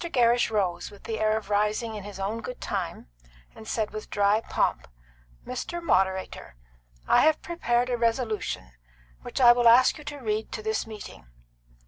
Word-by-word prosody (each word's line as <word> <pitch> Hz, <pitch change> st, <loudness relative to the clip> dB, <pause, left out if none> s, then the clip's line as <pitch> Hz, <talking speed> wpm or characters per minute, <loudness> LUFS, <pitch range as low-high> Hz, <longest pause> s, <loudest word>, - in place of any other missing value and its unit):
Gerrish 245 Hz, -7 st, +2 dB
rose, 195 Hz, -5 st, -1 dB
with 200 Hz, -, -16 dB
the 220 Hz, -1 st, -4 dB
air 215 Hz, 0 st, +2 dB
of 210 Hz, -1 st, -7 dB
rising 210 Hz, +2 st, 0 dB
in 210 Hz, -2 st, -6 dB
his 200 Hz, -1 st, -9 dB
own 210 Hz, +4 st, -3 dB
good 250 Hz, -, -7 dB
time, -, -, -4 dB, 0.5 s
and 220 Hz, -, -12 dB
said, 220 Hz, -2 st, -1 dB
with 215 Hz, -, -7 dB
dry 205 Hz, +2 st, +2 dB
pomp, -, -, -1 dB, 0.6 s
"Mr. 255 Hz, +7 st, -4 dB
Moderator, 190 Hz, -, -1 dB, 0.5 s
I -, -, +5 dB
have 310 Hz, 0 st, +3 dB
prepared 250 Hz, -7 st, 0 dB
a 245 Hz, -, 0 dB
resolution, 230 Hz, -, -1 dB, 0.5 s
which -, -, -5 dB
I 240 Hz, -2 st, +8 dB
will 240 Hz, 0 st, +4 dB
ask 250 Hz, +5 st, +6 dB
you -, -, -10 dB
to 295 Hz, -1 st, -6 dB
read 220 Hz, -4 st, -3 dB
to 215 Hz, -, -5 dB
this 220 Hz, +1 st, -1 dB
meeting." 205 Hz, -, -10 dB
220 Hz, 170 wpm, -26 LUFS, 210-245 Hz, 0.6 s, I